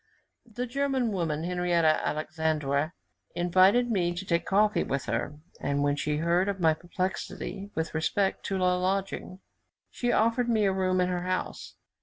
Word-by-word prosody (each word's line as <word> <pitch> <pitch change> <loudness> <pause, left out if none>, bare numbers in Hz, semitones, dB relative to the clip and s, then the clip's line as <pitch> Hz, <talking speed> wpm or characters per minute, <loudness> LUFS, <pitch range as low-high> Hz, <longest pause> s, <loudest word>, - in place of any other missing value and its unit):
The 245 +3 -3
German 265 -2 0
woman, 165 -5 -1
Henriette 175 -1 +1
Alexandwer, 155 -1 0 0.4
invited 190 +7 +4
me 175 -4 +1
to 185 +3 -5
take 170 -2 0
coffee 210 +2 +3
with 135 0 -2
her; 120 +5 -2 0.2
and 140 0 0
when 145 0 +2
she 150 +1 -1
heard 170 +4 +2
of 195 -1 -3
my 160 -2 +4
perplexity 185 +3 -4
with 160 0 -2
respect 190 +5 0
to 195 - -1
a - - 0 0.2
lodging, 190 0 -2 0.5
she 245 -1 -1
offered 230 +2 +2
me 220 -3 +3
a 195 - +2
room 185 -1 +1
in 180 - +1
her 180 -1 -1
house. 185 0 -3
180 Hz, 160 wpm, -28 LUFS, 160-200 Hz, 0.5 s, invited